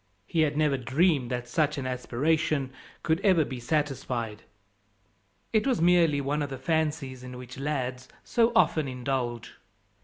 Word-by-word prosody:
He 160 +9 0
had 150 -1 +1
never 150 -3 +2
dreamed 135 +1 +2
that 125 -1 -3
such 150 +3 +1
an 135 - -3
aspiration 135 +3 0 0.3
could 160 +1 +1
ever 185 -6 +4
be 130 -2 -6
satisfied 120 -5 -2 1.1
it 220 +4 +2
was 255 -4 +2
merely 170 -3 +4
one 145 +2 -1
of 145 - -2
the 135 - -5
fancies 150 -3 -1
in 125 0 -8
which 125 +1 -9
lads 130 -3 -3 0.2
so 235 -1 +2
often 155 -9 +3
indulge. 125 -2 -3
140 Hz, 150 wpm, -28 LUFS, 125-160 Hz, 1.1 s, ever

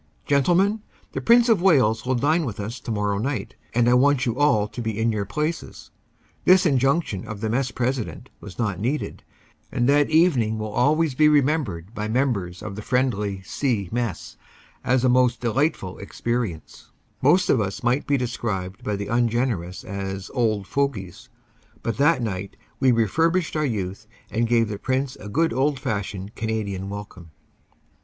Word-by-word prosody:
"Gentlemen, 180 +10 +2 0.3
the - - -4
Prince 235 +1 +5
of 220 -6 +4
Wales 125 - +3
will 130 - +2
dine 155 +7 +2
with 115 -8 -5
us 110 +5 -5
tomorrow 105 -3 -1
night, 135 +4 -3 0.2
and 120 0 +3
I 120 - +5
want 135 +1 +4
you 115 -2 -1
all 135 -7 +3
to 120 - -7
be 110 -2 -3
in 115 +1 +2
your 105 -2 -2
places." 150 - -4 0.5
The 185 +1 +7
injunction 135 - +1
of 110 -2 -6
the 110 0 -2
mess 130 +2 0
president 125 -2 -3
was 105 -4 -11
not 105 -6 -1
needed 130 +8 -3 0.5
and 120 -2 +1
that 145 +1 +4
evening 145 -10 +3
will 110 0 -4
always 150 +5 +2
be 150 +4 +4
remembered 135 - +1
by 105 -1 -3
members 110 -7 -1
of 105 -1 -6
friendly 105 -7 0
"C 110 -4 -1
Mess 115 -6 -3 0.5
as 125 0 +2
a - - +4
most 125 -1 +3
delightful 120 - -1
experi 115 -1 -2
ence 80 - -17 0.3
most 185 +1 +4
of 125 - +3
us 100 +4 -4
might 125 +4 +1
be 140 - +3
described 110 -7 -3
by 105 - -1
the 100 0 -4
ungenerous 115 -5 -1
as 95 -1 -5
"old 110 -5 0
fogies," 110 -9 -3 0.5
but 115 - -2
that 140 -2 +3
night 100 -3 -4 0.2
we 130 -1 +4
refurbished 160 - +1
our 155 -1 +1
youth 100 -2 -4 0.2
and 115 +1 +1
gave 115 -1 +3
the 105 -1 -5
Prince 130 0 -1
a 105 - -9
good 160 +7 +1
old 135 +2 +1
fashioned 100 -3 -4
Canadian 105 -4 -3
welcome. 100 -4 -8
120 Hz, 165 wpm, -23 LUFS, 105-140 Hz, 0.5 s, The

